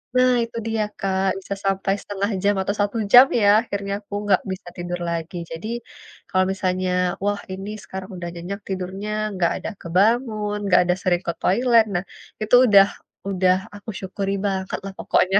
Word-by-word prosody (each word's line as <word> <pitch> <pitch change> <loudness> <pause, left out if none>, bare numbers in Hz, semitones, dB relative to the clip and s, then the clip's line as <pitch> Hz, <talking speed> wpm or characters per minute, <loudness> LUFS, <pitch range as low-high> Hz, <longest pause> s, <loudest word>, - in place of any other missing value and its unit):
nah, 255 0 +5
itu 230 0 -7
dia 225 -1 0 0.2
Kak, 190 0 0
bisa 200 +1 -5
sampai 195 0 +1
1/2 200 +1 -2
jam 205 0 +4
atau 200 +2 -1
1 205 +3 0 0.2
jam 250 +2 +11 0.2
ya, 205 - +4 0.2
akhirnya 200 -3 -4
aku 200 - -13
enggak 195 -3 +3
bisa 190 -1 -7
tidur 175 0 -4
lagi. 170 +1 -4
Jadi, 165 +6 -6 0.6
kalau 185 0 +3
misalnya, 185 -1 -1 0.3
wah, 205 0 0
ini 195 +2 -6
sekarang 190 +1 -7
udah 175 - -5
nyenyak 185 +4 -5
tidurnya, 190 +2 -4 0.2
enggak 180 -3 +1
ada - - -2
kebangun, 210 +3 +1
enggak 180 -1 +5
ada 180 0 +2
sering 175 -2 +1
ke - - +2
toilet. 230 +2 +4
Nah, 175 - 0 0.4
itu 215 +3 +4
udah 195 -2 +7 0.4
udah 185 -1 +3 0.2
aku 205 +2 -10
syukuri 195 +1 -3
banget 190 -1 -2
lah 195 - -5
pokoknya. 190 +2 +3
195 Hz, 170 wpm, -22 LUFS, 185-205 Hz, 0.6 s, jam